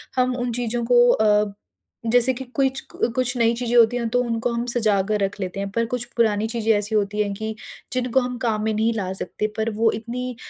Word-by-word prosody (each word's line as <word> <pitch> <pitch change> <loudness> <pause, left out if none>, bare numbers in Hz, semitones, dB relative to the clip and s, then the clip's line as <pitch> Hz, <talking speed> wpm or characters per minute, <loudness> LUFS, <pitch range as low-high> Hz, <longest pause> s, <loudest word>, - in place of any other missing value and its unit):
हम 255 -1 +1
उन 245 -1 -2
चीज़ों 240 0 -2
को 245 0 +6
अ, 210 -1 +2 0.6
जैसे 245 +2 +4
कि 265 - -6
कुछ 270 -1 +1
क 240 - 0
कुछ 255 0 +1
नई 230 0 +3
चीज़ें 240 0 -2
होती 235 0 +5
हैं, 235 -1 -1
तो 245 +2 +2
उनको 235 0 -1
हम 235 +1 -2
सजा 215 -5 +2
कर 210 -1 +1
रख 195 +1 -2
लेते 185 0 -4
हैं, 200 0 -3
पर 230 +2 0
कुछ 250 -1 -1
पुरानी 220 -2 +2
चीज़ें 225 -1 0
ऐसी 210 +1 -1
होती 210 0 0
हैं 205 -1 -1
कि 220 +1 -5 0.4
जिनको 255 0 +1
हम 250 0 -4
काम 215 -2 0
में 220 0 0
नहीं 220 +2 +1
ला 190 -4 -3
सकते, 200 +3 -3
पर 220 +1 0
वो 225 0 +3
इतनी 245 +3 -5
230 Hz, 230 wpm, -22 LUFS, 210-245 Hz, 0.6 s, को